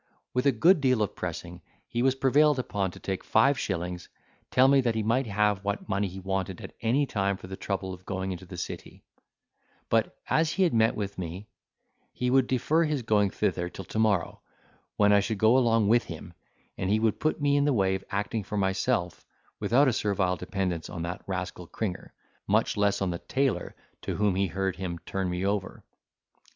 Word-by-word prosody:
With 125 +2 +1
a - - +6
good 160 - +4
deal 130 -5 +3
of 100 - -4
pressing, 90 0 -6 0.3
he 120 - -2
was 130 +1 +3
prevailed 140 +2 +4
upon 100 -6 -1
to - - -12
take 95 -1 -4
five 140 -1 +3
shillings 90 -4 -3 0.4
telling 130 +2 +5
me 140 -1 +5
that 120 -3 0
he 110 - 0
might 115 +4 +1
have 105 -1 +1
what 100 +1 -3
money 100 -1 0
he 95 +1 -8
wanted 95 -1 -3
at - - -9
any 125 +6 +2
time 100 -5 -1
for - - -11
the 95 +1 -6
trouble 95 -1 -3
of 90 0 -11
going 95 0 -3
into 90 0 -7
the 90 - -9
city; 85 - -7 0.9
but - - +1
as 160 0 +2
he 190 +2 +2
had 175 - +2
met 115 0 +3
with 100 -2 -4
me, 90 +3 -5 0.7
he 125 0 -1
would 130 -1 +4
defer 150 +6 +2
his 150 -5 -1
going 105 -3 +3
thither 90 -3 -1
till 95 - -9
tomorrow, 105 -5 0 0.6
when 105 0 +5
I 100 - +6
should 105 +2 -2
go 110 +4 +4
along 115 -4 +3
with 115 +2 +4
him, 85 +1 -9 0.5
and 95 - -1
he 105 +2 +3
would 110 -1 +1
put 155 +2 0
me 145 -1 +2
in 145 0 +3
the 145 - +3
way 95 -6 +2
of 95 0 -3
acting 105 +2 -2
for 105 +2 -5
myself, 95 -2 0 0.4
without 135 +5 +3
a 130 - +3
servile 100 -3 0
dependence 90 -2 -3
on 85 - -5
that 85 +1 -4
rascal 90 -2 -4
Cringer, 95 -2 -4 0.4
much - - +2
less 100 -1 +1
on 95 - 0
the 85 - -4
tailor 130 -9 -1 0.3
to - - -3
whom 105 -2 +2
he 95 +1 +1
heard 95 +1 -2
him 90 -2 -4
turn 95 -1 -2
me 90 +2 -2
over. 100 -1 -2
100 Hz, 205 wpm, -28 LUFS, 95-120 Hz, 0.9 s, a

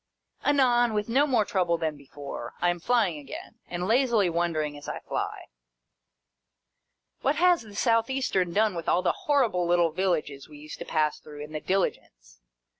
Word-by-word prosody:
Anon, 245 -5 +3
with 210 +1 -1
no 275 +5 +3
more 240 -6 +2
trouble 175 -4 +1
than 160 -2 -2
before, 140 -3 -8
I 175 - +3
am 175 - -5
flying 200 -6 +1
again, 145 +10 -10
and 180 +1 -3
lazily 230 -5 +3
wondering 160 -3 -1
as 145 - -8
I - - -4
fly. - - -4 1.8
What 275 +3 +1
has 355 +1 +4
the 210 -3 -13
South 230 +1 +2
Eastern 225 -10 0
done 210 +2 +2
with 170 -2 -3
all 180 - +2
the - - +3 0.2
horrible 230 -12 +2
little 175 -1 +3
villages 155 -6 -2
we 150 - -12
used 150 +1 -10
to - - -6
pass 155 -1 0
through, 150 -1 -11
in 150 - -10
the 155 -1 -4
Diligence - - -3
180 Hz, 175 wpm, -27 LUFS, 155-230 Hz, 1.8 s, has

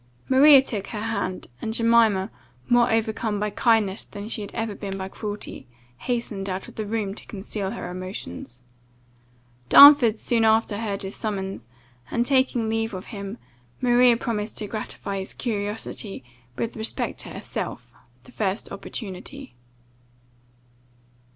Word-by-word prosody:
Maria 270 +1 +8
took 210 -7 -3
her 215 -3 -5
hand, 215 -4 -3 0.2
and 220 0 -3
Jemima, 230 -4 +3 0.4
more 240 0 +4
overcome 220 -1 0
by 210 0 -1
kindness 220 -3 +2
than 205 0 -8
she 225 -1 -1
had 200 - -7
ever 225 -2 -2
been 195 -1 -5
by 190 0 -4
cruelty, 210 - -6 0.3
hastened 215 - -2
out 185 +1 -4
of - - -12
the 215 -1 -5
room 210 -2 -2
to - - -11
conceal 200 -1 -4
her 190 - -5
emotions. 180 - -7 1.1
Darnford 280 -6 +9
soon 230 +1 +1
after 220 -1 +3
heard 205 -3 -2
his 195 +1 -5
summons, 195 - -4 0.4
and, 235 - 0
taking 260 -4 +2
leave 225 -1 -1
of 185 - -7
him, 200 +1 -6 0.4
Maria 245 -1 +5
promised 220 -2 -3
to 215 - -2
gratify 200 -2 -4
his 190 - -5
curiosity, 210 - -4 0.3
with 230 - -3
respect 220 -1 -3
to - - -5
herself, - - -6 0.3
the 250 - -16
first 205 -3 -2
opportunity. 205 +7 -8
215 Hz, 140 wpm, -24 LUFS, 195-230 Hz, 1.1 s, Darnford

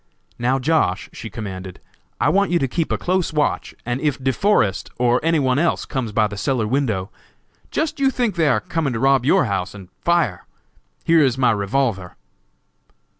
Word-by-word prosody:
"Now, 125 +3 +1
Josh.," 135 - 0
she 115 - -7
commanded, 95 -5 -7 0.4
"I - - +3
want 200 0 +2
you 175 - +2
to 135 - 0
keep 160 +5 -2
a - - +1
close 185 0 0
watch, 150 -1 -1
and 120 +2 -2
if 150 -3 0
De 130 0 0
Forest, 125 - +1
or 125 0 +3
any 165 +1 +2
one 130 -2 +2
else 170 +1 +1
comes 125 -5 -3
by 110 +1 +2
the 100 -1 -5
cellar 120 +1 0
window, 110 -5 -1 0.6
just 315 -1 -2
you 270 -1 +4
think 245 -5 0
they 165 -3 +1
are - - +2
coming 165 -7 -2
to 115 - -2
rob 135 0 +3
your 140 - +4
house, 100 -2 -2
and 95 -3 -11
fire! 170 - +1 0.6
Here 165 -1 +4
is 130 -2 +1
my 130 -2 +3
revolver." 100 -2 -1
130 Hz, 185 wpm, -21 LUFS, 110-165 Hz, 0.6 s, you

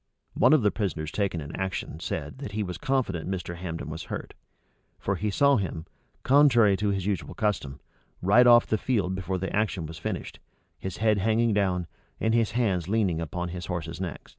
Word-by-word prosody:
One - - +4
of 150 -7 +4
the 105 - +4
prisoners 85 -7 -3
taken 100 -5 -1
in 75 - -7
the - - -7
action, 95 -4 -3
said, 80 - -4
that 120 -8 -6
he 105 0 -1
was 90 -2 -5
confident 130 - -1
Mr. 90 -2 -4
Hambden 85 -2 -5
was 80 +2 -6
hurt: - - -6 0.6
for 100 - -1
he 105 +4 -1
saw 140 +6 +4
him, 85 -5 -3 0.4
contrary 125 -7 +5
to 105 +1 0
his 95 -2 -1
usual 100 -5 -2
custom, 95 -11 -1 0.4
ride 110 +7 +5
off 120 -1 +7
the 110 - 0
field 100 -8 0
before 95 0 -2
the 95 +2 -3
action 100 -5 0
was 80 0 -8
finished; - - -5 0.4
his 95 -2 -5
head 110 -2 +2
hanging 110 +2 +2
down, 95 -3 +1 0.3
and 110 0 +1
his 115 -2 +2
hands 100 -8 0
leaning 100 -7 +1
upon 90 +2 -4
his 90 0 -6
horse's 85 -1 -4
neck. 90 -5 -5
95 Hz, 195 wpm, -27 LUFS, 90-110 Hz, 0.6 s, off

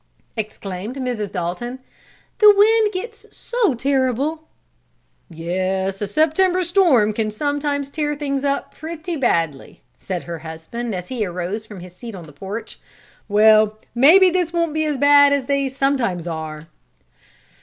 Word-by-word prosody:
exclaimed 210 0 -5
Mrs. 245 -7 -3
Dalton. 195 +8 -4 0.6
"The 425 -1 +9
wind 435 +1 +4
gets 435 +4 -7
so 460 - 0
terrible!" 275 +4 -1 0.8
"Yes, 185 +3 -2
a 205 - -1
September 355 - +2
storm 330 - +3
can 215 0 -1
sometimes 285 +4 -2
tear 295 -1 -2
things 280 -2 -3
up 280 0 -1
pretty 325 +2 -6
badly," 165 - -1 0.2
said 185 -3 -4
her 170 -1 -6
husband, 160 +9 -6
as 180 -1 -6
he 245 -4 -2
arose 185 +4 -4
from 205 -4 -10
his 180 0 -12
seat 230 +2 -9
on 180 - -9
the 150 - -14
porch. 195 +9 -7 0.5
"Well, 215 +1 +5 0.2
maybe 345 +10 +6
this 355 -2 0
won't 335 -2 0
be 315 0 0
as 300 -2 -1
bad 285 0 +6
as 280 -2 0
they 280 0 0
sometimes 260 - 0
are." 160 -2 -6
250 Hz, 145 wpm, -20 LUFS, 190-300 Hz, 0.8 s, The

